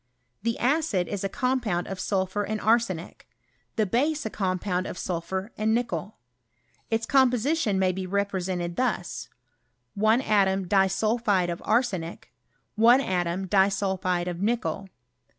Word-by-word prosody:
Tlie 230 0 0
acid 255 - +1
is 200 -2 -4
a 195 - -1
compound 245 -8 0
of 195 -1 -5
sulphur 190 +1 -1
and 215 +1 -2
arsenic, 215 -7 0 0.5
the 220 - +2
base 285 +9 0
a* 220 - -3
compound 185 -1 -1
of - - -6
sulphur 190 +4 -3
and 220 +1 +2
nickel. 235 -3 -3 0.7
Its 225 0 0
com 265 0 +5
position 245 -3 0
may 190 -1 +2
be.represented 185 -2 -2
thus: 240 -9 -2 0.7
I 215 +2 +4
atom 195 -5 +2
disulphide 195 0 +2
of 170 - -5
arsenic 210 -8 -1 0.5
I 240 +3 +8
atom, 180 -5 -1
disulphide 190 -2 +1
of 175 0 -4
nickel. 215 -3 -1
200 Hz, 130 wpm, -26 LUFS, 185-230 Hz, 0.7 s, I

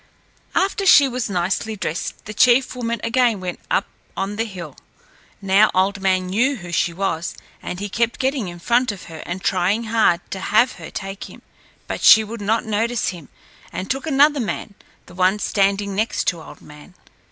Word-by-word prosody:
After 395 +1 +1
she 285 -6 +8
was 250 -3 -3
nicely 190 +4 -1
dressed 170 -4 -4
the 210 - -7
chief 250 +4 +4
woman 235 -2 -2
again 235 -2 +2
went 180 -1 -5
up 195 - +1 0.3
on 195 +2 -2
the 225 +2 -1
hill. 175 - -8 0.7
Now, 195 +2 +5
Old 195 +1 +1
Man 185 -1 +1
knew 235 +10 +1
who 175 -7 -9
she 170 +1 +1
was, 170 -2 -3 0.3
and 180 - -6
he 205 - -3
kept 235 +3 -1
getting 265 -5 -1
in 175 0 -7
front 240 +7 +1
of 200 - -10
her 160 -2 -9
and 180 +2 -5
trying 190 +4 +1
hard 220 -6 +2
to 190 - -4
have 215 +6 +3
her - - -8
take 195 0 -6
him, - - -14 0.4
but - - -5
she 220 - +8
would 220 +1 -7
not 220 +3 0
notice 225 +2 0
him 170 -7 -9 0.4
and 190 - -4
took 270 +3 -3
another 290 0 +4
man, 215 -3 -4 0.3
the - - -15
one 185 +2 +2
standing 200 -1 0
next 215 +4 -1
to 170 -3 -6
Old - - -13
Man. 150 +5 -15
205 Hz, 185 wpm, -21 LUFS, 185-235 Hz, 0.7 s, she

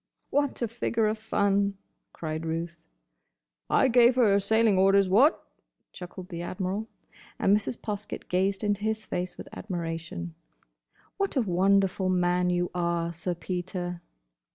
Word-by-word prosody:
"What 285 -3 0
a - - +1
figure 230 0 -1
of 215 +1 0
fun!" 200 -2 +1 0.3
cried 155 0 -5
Ruth. 165 +1 -4 0.9
"I - - +4
gave 240 0 +5
here 240 -5 +4
her 200 - +4
sailing 220 0 +3
orders—what?" 195 - +4 0.5
chuckled 180 0 -9
the 170 -2 -5
Admiral. 190 +4 -3 0.5
And 200 - +4
Mrs. 210 +3 -2
Poskett 210 -1 -5
gazed 190 +3 0
into 205 -1 0
his 220 0 -2
face 180 +1 -4
with - - -9
admiration. 170 -2 -5 0.8
"What 395 -4 -1
a 265 - +3
wonderful 190 -1 +2
man 180 0 +2
you 175 0 0
are, 170 -1 -1
Sir 175 +2 -3
Peter!" 175 0 -4
190 Hz, 135 wpm, -27 LUFS, 175-215 Hz, 0.9 s, gave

